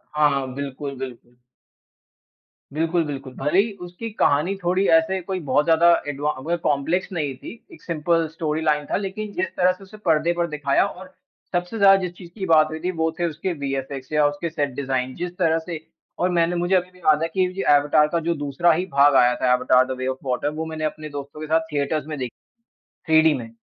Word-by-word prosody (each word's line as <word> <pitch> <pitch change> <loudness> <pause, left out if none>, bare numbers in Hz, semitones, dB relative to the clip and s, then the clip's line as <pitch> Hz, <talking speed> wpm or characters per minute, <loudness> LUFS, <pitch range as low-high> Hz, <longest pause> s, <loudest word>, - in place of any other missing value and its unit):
हाँ, 150 -1 +4
हाँ। 135 -2 -2
बिल्कुल, 140 0 -5
बिल्कुल। 125 -2 -9 1.3
बिल्कुल, 165 +2 +1
बिल्कुल। 135 -3 -6
भले 150 +7 +1
ही 220 +3 +2
उसकी 180 +6 -7
कहानी 150 +7 +2
थोड़ी 185 +3 +2
ऐसे 165 +4 +2
कोई 185 +1 -4
बहुत 145 +1 +2
ज़्यादा 165 +1 +4 0.2
एडवां 145 +1 -1
वो 170 +3 -1
कॉम्प्लेक्स 160 +7 0
नहीं 150 -5 -2
थी - - -9 0.2
एक 330 - -15
सिंपल 165 0 0
स्टोरीलाइन 155 -2 0
था। - - +2
लेकिन 205 +1 -5
जिस 185 0 -1
तरह 180 0 +4
से 185 +2 -10
उसे 195 +3 -13
पर्दे 165 0 +3
पर 170 0 -1
दिखाया 150 -1 +1
और 185 -1 -9 0.4
सबसे 180 +5 -2
ज़्यादा 195 -2 +7
जिस 180 -2 -3
चीज़ 175 -3 -11
की 190 - -2
बात 155 -3 +5
हुई 160 0 -5
थी 180 +3 -2
वो 160 0 +2
थे 175 - +1
उसके 170 +3 -3
वीएफएक्स 135 0 -4
या 150 -1 +3
उसके 145 +3 -3
सेट 145 -3 -1
डिज़ाइन। 130 -2 -2
जिस 175 0 -4
तरह 165 -3 +2
से 165 -1 -6 0.4
और 180 - +2
मैंने 175 0 +1
मुझे 175 +2 +1
अभी 180 0 0
भी 180 - -20
याद 155 -3 +3
है - - +1
की 185 -1 +2 0.2
एवाटार 145 0 +4
का 170 - +1
जो 170 +1 -1
दूसरा 145 +4 +1
ही 175 +4 -1
भाग 140 0 +5
आया 125 -1 +5
था 125 - +4
Avatar 125 0 +4
the - - -8
way 130 0 -3
of 130 0 -2
water. 130 +3 0
वो 160 - -2
मैंने 160 -1 -5
अपने 155 0 -4
दोस्तों 145 +1 -8
के 155 - -5
साथ 160 +1 +3
थिएटर्स 145 0 -1
में 155 -1 -5
देखी 125 -1 -3 0.8
3 160 0 +6
डी 160 -1 +4
में। 120 -4 -5
155 Hz, 215 wpm, -23 LUFS, 140-175 Hz, 1.3 s, ज़्यादा